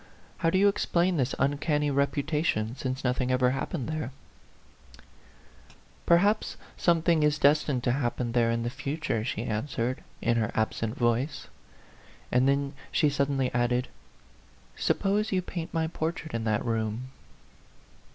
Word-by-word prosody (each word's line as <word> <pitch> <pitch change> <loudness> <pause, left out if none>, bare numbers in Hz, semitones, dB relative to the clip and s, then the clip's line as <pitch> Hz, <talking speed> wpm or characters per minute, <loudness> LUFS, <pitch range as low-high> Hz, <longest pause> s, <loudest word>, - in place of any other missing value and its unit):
How 165 - +2
do 185 - +2
you 200 +2 +5
explain 180 -3 +1
this 130 -1 0
uncanny 145 +1 +1
reputation, 140 -4 0
since 130 0 -4
nothing 125 0 0
ever 125 0 +3
happened 135 +1 -3
there 155 -4 -3 0.7
?" - - -24
" - - -27
Perhaps 200 +5 +3 0.2
something 170 -1 +3
is 150 0 +3
destined 145 -3 +3
to 120 - +2
happen 120 -2 -1
there 120 -1 +3
in 115 0 0
the 120 - -2
future," 140 -4 -2
she 115 -1 -3
answered, 120 +2 -2 0.2
in 120 0 +1
her 110 -1 +1
ab 110 0 +1
sent 115 +1 -3
voice. 125 +4 0 0.8
And 125 +2 +3
then 140 0 +1 0.2
she 150 -3 +3
suddenly 140 -2 0
added, 120 +1 +1 0.9
"Suppose 210 +2 +1
you 185 -2 +1
paint 170 -2 -5
my 165 -1 0
portrait 160 0 -4
in 115 -1 -2
that 110 0 0
room 115 +2 -2
135 Hz, 145 wpm, -28 LUFS, 120-155 Hz, 0.9 s, you